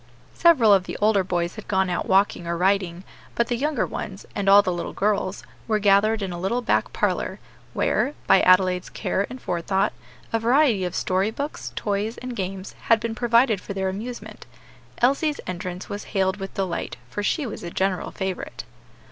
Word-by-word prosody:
Several 265 -12 +5
of 190 -2 +3
the - - -5
older 210 -2 +3
boys 175 -1 -1
had 215 - -9
gone 190 -1 +1
out 175 -1 -2
walking 190 -3 +2
or 170 0 -1
riding, 185 -1 +1 0.3
but 235 - +1
the 240 - +1
younger 285 0 0
ones, 195 0 -6
and 200 -1 0
all 200 +1 +8
the 185 - -1
little 175 - -4
girls, 200 -1 -1 0.2
were 220 -2 +2
gathered 210 +1 +3
in 190 - -3
a 175 - -6
little 235 +7 -1
back - - +1
parlor, - - -1 0.3
where, 285 - 0
by 190 - +5
Adelaide's 185 0 +4
care 195 - -2
and 255 +1 -8
forethought, 190 +1 0 0.4
a 225 - +2
variety 235 -4 +3
of 180 - -4
story 190 +3 +1
books, 280 +7 -5
toys, 205 +2 -2
and 250 -1 -6
games, 190 -1 -5
had 230 -1 +5
been 230 +1 -3
provided 235 -2 +3
for - - -6
their 190 -1 0
amusement. 230 +6 -7 0.6
Elsie's 280 +4 +2
entrance 180 0 -5
was 205 +1 -6
hailed 190 0 0
with 195 -1 -7
delight, 190 -3 -3
for 205 - -4
she 285 +8 0
was 225 - -6
a 170 - -4
general 190 +1 -1
favorite. 190 -2 -5
200 Hz, 185 wpm, -24 LUFS, 185-225 Hz, 0.6 s, all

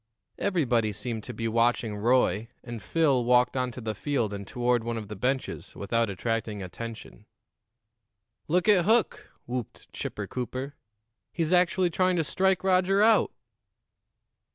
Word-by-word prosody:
Everybody 125 - +1
seemed 110 +1 -5
to 125 - -6
be 115 +1 -2
watching 115 -1 +1
Roy, 115 -1 +2 0.2
and 120 -2 -7
Phil 145 -7 +2
walked 125 +1 +3
on 125 -1 0
to 125 - -8
the 110 -1 -3
field 115 -2 -1
and 100 -1 -6
toward 120 -1 0
one 115 0 -3
of 105 -3 -7
the 105 - -5
benches 130 +6 -3
without 115 +2 0
attracting 110 0 -3
attention. 110 - -9 1.2
"Look 180 +5 +1
at 190 -5 +5
Hook!" 225 +1 +2 0.2
whooped 125 -2 -6
Chipper - - -4
Cooper. 130 +2 -5 0.6
"He's 165 0 -1
actually 180 0 +3
trying 185 +2 +2
to 165 - +1
strike 190 +2 +1
Roger 190 +1 +3
out!" 220 -1 +4
125 Hz, 145 wpm, -27 LUFS, 115-170 Hz, 1.2 s, at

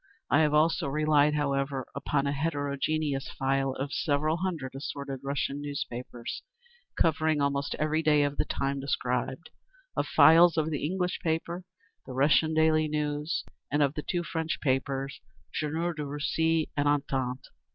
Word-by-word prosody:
I 145 - +5
have 155 -2 +4
also 155 -1 +3
relied, 150 +1 +3
however, 140 -2 -1
upon 140 -1 -1
a 140 - +1
heterogeneous 145 -1 -1
file 135 0 +1
of 135 +2 -4
several 155 +1 +1
hundred 170 -8 -3
assorted 140 0 -5
Russian 140 0 -2
newspapers, 125 -4 -5 0.6
covering 160 -1 +2
almost 140 0 0
every 155 +1 +1
day 150 -2 +4
of 145 0 -1
the - - +1
time 140 0 -2
described, 130 +2 -2 0.4
of - - 0
files 165 +3 +7
of 160 0 +1
the 145 - -2
English 180 +3 -1
paper, 170 +2 -2 0.4
the 130 - -6
Russian 150 +4 +3
Daily 155 0 +4
News, 150 +1 -1 0.3
and 145 +1 +2
of 140 -1 +1
the 155 - -4
two 175 +3 -2
French 160 -1 -2
papers, 135 -1 -1 0.3
Journal 160 +3 -1
de 155 -2 -4
Russie 155 +3 0
and 145 0 +1
_Entente. 135 -3 0
145 Hz, 150 wpm, -29 LUFS, 140-160 Hz, 0.6 s, files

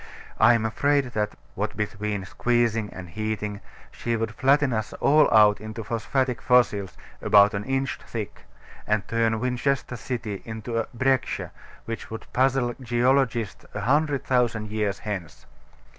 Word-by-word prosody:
I 120 +2 +7
am 110 -1 0
afraid 140 +3 +1
that 105 -1 -1 0.2
what 105 +2 -3
between 105 -2 -3
squeezing 115 0 0
and 95 -1 -8
heating 105 +2 -4 0.3
she 115 0 -2
would 115 -1 -2
flatten 140 +1 +3
us 110 -1 -2
all 150 +1 +4
out 105 -2 +5
into 110 +1 -6
phosphatic 125 +4 -1
fossils, 105 -7 +2 0.2
about 105 -1 +6
an 100 0 -2
inch 135 0 -1
thick; 110 -3 -6 0.4
and 105 -1 0
turn 115 -1 +1
Winchester 125 +1 -1
city 110 -4 -4
into 110 +1 -4
a 115 - -2
"breccia" 130 +1 0 0.3
which 115 0 -6
would 110 - -7
puzzle 130 -1 +2
geologists 120 -2 +1
a - - -2
hundred 145 +1 +1
thousand 115 -4 0
years 105 -2 -1
hence. 100 -7 -6
115 Hz, 145 wpm, -25 LUFS, 105-125 Hz, 0.4 s, I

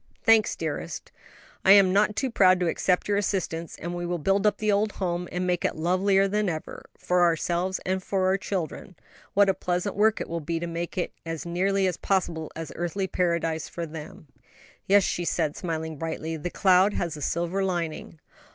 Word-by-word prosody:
"Thanks, 225 -1 +4
dearest; - - -5 0.5
I 195 - +8
am 195 -2 +6
not 210 +1 +3
too 265 +2 -1
proud 185 -4 +5
to 180 - +1
accept 180 +2 +1
your 205 -1 +1
assistance, 180 -5 -2
and 170 +2 -5
we 175 0 -4
will 175 0 -2
build 195 +6 +2
up 210 - +1
the 215 -1 +1
old 205 +1 +1
home 175 -2 -3
and 180 +1 -2
make 180 -1 0
it - - 0
lovelier 190 +4 +2
than 210 0 0
ever, 160 -2 -6
for 180 0 +1
ourselves 175 +2 +1
and 185 +1 0
for 190 0 -1
our 190 +1 +3
children; 185 0 -4 0.4
what 200 0 +5
a 195 - +4
pleasant 180 +2 -2
work 215 +2 +3
it - - -4
will 170 0 -3
be 165 +2 -3
to 170 - -3
make 170 +3 -5
it 180 - -2
as 165 -1 -5
nearly 190 +3 +1
as 180 -2 0
possible 170 -5 -1
an 165 +1 -4
earthly 175 +3 -2
paradise 170 -4 -1
for 170 - -5
them." 155 0 -9 0.6
"Yes," 200 0 +5
she 175 - -1
said, 160 -3 0
smiling 160 -3 -4
brightly; 160 +1 -4
"the 160 +3 -4
cloud 190 +2 +4
has 170 -3 -2
a 150 - -9
silver 170 +6 -1
lining." 170 -3 -3
180 Hz, 195 wpm, -26 LUFS, 165-195 Hz, 0.6 s, I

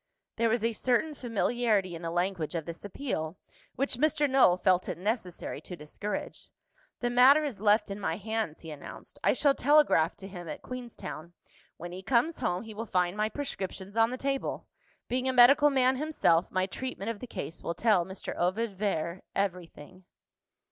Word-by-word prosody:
There 230 0 +2
was 225 0 +1
a 230 0 +1
certain 250 +7 +1
familiarity 230 -6 0
in 165 - -7
the 165 - -3
language 175 -1 -1
of 165 -2 -2
this 170 0 -8
appeal, 190 - -4 0.4
which 270 -2 -1
Mr. 295 +1 +2
Null 260 -10 +5
felt 185 0 +2
it - - -3
necessary 185 -2 -3
to 180 - -8
discourage. 175 +7 -6 0.5
"The 240 -1 0
matter 265 +5 +7
is 250 -10 -4
left 210 0 +3
in 200 - -5
my 165 -5 -1
hands," 220 -4 -3
he 160 - -8
announced. 145 -2 -10
"I - - +4
shall 285 -2 +3
telegraph 285 - +4
to 195 - -10
him 175 -3 -8
at 150 - -7
Queenstown. 235 -9 -7 0.4
When 175 +1 -7
he 185 +1 -7
comes 255 - +1
home, 180 +3 -1
he 220 -1 -9
will 225 +2 -5
find 180 -1 +1
my 215 +1 0
prescriptions 200 -7 -5
on 225 0 +4
the 255 - -4
table. 275 0 -2 0.4
Being 255 +1 0
a - - 0
medical 275 +4 +7
man 260 -1 +3
himself, 260 - +2
my 185 0 +1
treatment 230 0 -4
of 220 - -8
the 250 - -7
case 165 -7 -6
will 170 - -3
tell 205 -1 +3
Mr. 190 +2 -6
Ovid 195 +4 0
Vere 180 -3 -1
everything." 180 -2 -4
210 Hz, 180 wpm, -29 LUFS, 180-250 Hz, 0.5 s, matter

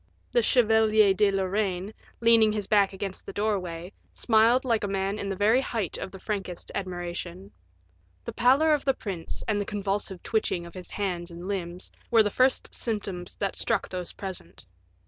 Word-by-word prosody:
The 485 - +4
Chevalier 220 - +4
de 205 +1 +3
Lorraine, 195 0 -1 0.3
leaning 230 -2 +6
his 210 -2 -2
back 200 -1 +3
against 195 -1 -6
the - - -6
doorway, 185 -4 -2 0.2
smiled 235 +3 +4
like 230 -4 +1
a - - 0
man 195 +1 -1
in 200 - -3
the 195 - -2
very 215 +6 +3
height 225 - -2
of - - -5
the 190 - -10
frankest 190 -3 -5
admiration. 175 - -5 0.7
The - - -5
pallor 280 +6 +4
of 295 - 0
the 270 -1 +2
prince, 185 -9 -5
and 205 -1 +1
the - - 0
convulsive 200 -2 -3
twitching 200 -6 -1
of 170 - -11
his 185 -1 -9
hands 180 -4 -3
and 170 +2 -8
limbs, 180 -2 -4 0.2
were 230 -2 +6
the 205 - -1
first 255 +4 +2
symptoms 200 -6 -4
that 195 -1 -2
struck 225 -4 -1
those 180 -2 -4
present. 190 - -7
200 Hz, 175 wpm, -27 LUFS, 185-220 Hz, 0.7 s, leaning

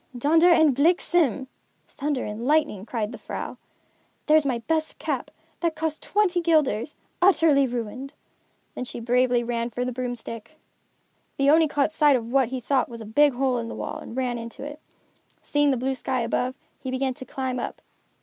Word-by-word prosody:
"Donder 320 +7 +4
en 315 -4 +5
Bliksem" 305 - +2 0.4
(thunder 285 -2 -3
and 210 +2 -5
lightning), 285 -10 +1
cried 220 -2 -2
the - - -9
vrouw. - - -6 0.7
"There's 305 -1 +4
my 250 -3 0
best 310 +7 -2
cap, - - -3 0.3
that 335 -2 0
cost 315 -1 -3
twenty 375 -4 +1
guilders, 300 -6 +1 0.3
utterly 325 -7 +5
ruined." 245 +3 -5 0.6
Then - - -4
she 245 - -6
bravely 245 +1 +2
ran 235 0 -2
for 245 +2 -3
the 255 - -2
broomstick. 245 +2 -6 0.8
The 275 +1 +4
Oni 320 +1 +5
caught 290 0 +1
sight 295 -3 +4
of 235 -1 -3
what 265 -2 +3
he 260 0 -3
thought 255 +1 0
was 235 -1 -8
a - - -7
big 285 +6 +4
hole 255 -1 0
in 230 - -4
the - - -6
wall - - -5
and 230 - -9
ran 250 -2 -1
into 230 +2 -8
it. 295 +1 -7 0.6
Seeing 290 0 +2
the 265 - +2
blue 260 +3 -1
sky 260 -1 -2
above, 250 +2 -1 0.2
he 260 - -6
began 260 0 -1
to 255 - -10
climb 260 0 -3
up. - - -5
265 Hz, 180 wpm, -25 LUFS, 240-300 Hz, 0.8 s, en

